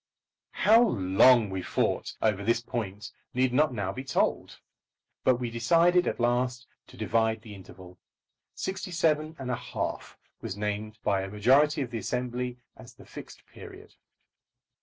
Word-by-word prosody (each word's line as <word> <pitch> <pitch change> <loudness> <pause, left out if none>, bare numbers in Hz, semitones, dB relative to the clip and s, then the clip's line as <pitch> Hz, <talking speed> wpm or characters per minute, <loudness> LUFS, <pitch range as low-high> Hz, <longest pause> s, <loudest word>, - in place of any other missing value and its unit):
How 225 +3 +7
long 105 - +4
we 95 -1 -3
fought - - -1
over 105 -2 +1
this 115 +2 +2
point 110 -3 -5 0.2
need 125 0 +1
not 150 +2 +3
now 105 -6 -3
be 130 - -6
told. 135 - -1 0.6
But 130 - +4
we 120 -1 -4
decided 170 +10 +3
at - - -2
last 125 +1 0 0.2
to - - -16
divide 110 -1 0
the 110 - -10
interval. 95 -1 -13 0.6
Sixty 190 0 -4
seven 160 -2 0
and 130 -2 -4
a - - 0
half - - -5 0.2
was 100 - -5
named 105 +1 -4
by 100 -2 +1
a 95 - -5
majority 135 +9 +3
of 120 - -8
the 115 - -3
Assembly 125 +3 -3 0.2
as - - -14
the - - -16
Fixed - - -12
Period. - - -13
120 Hz, 155 wpm, -28 LUFS, 105-135 Hz, 0.6 s, How